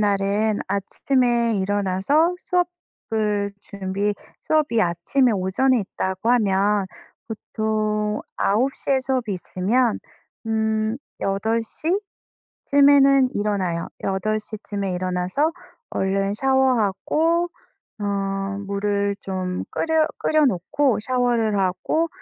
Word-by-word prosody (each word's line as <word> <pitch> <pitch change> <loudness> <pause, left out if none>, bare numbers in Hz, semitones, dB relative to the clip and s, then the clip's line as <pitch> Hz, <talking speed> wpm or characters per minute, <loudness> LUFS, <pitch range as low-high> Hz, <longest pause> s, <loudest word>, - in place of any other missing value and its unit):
날은 205 +1 +1
아침에 235 +4 +1
일어나서 205 - +1
수업을 220 - -2
준비 200 +1 -2 0.3
수업이 295 -7 +2
아침에 220 +8 +2
오전에 215 +7 +2
있다고 190 +2 -2
하면 205 -3 +2 0.4
보통 215 -1 -1 0.2
9:00 255 +7 0
에 265 - +4
수업이 255 -6 -1
있으면 215 +7 0 0.5
음 220 0 0 0.2
8:00 225 +8 -1 0.8
쯤 285 -1 +5
에는 275 -2 +6
일어나요. 195 -5 -1
8:00 215 +3 -2
쯤에 200 -2 -3
일어나서 185 - 0 0.4
얼른 195 +1 0
샤워하고 265 - +2 0.5
어 - - -2 0.6
물을 200 0 0
좀 185 -1 -3
끓여 320 -1 +1
끓여 310 -1 +3
놓고 255 +6 +1
샤워를 235 -3 +1
하고 190 - 0
215 Hz, 195 characters per minute, -23 LUFS, 195-260 Hz, 0.8 s, 에는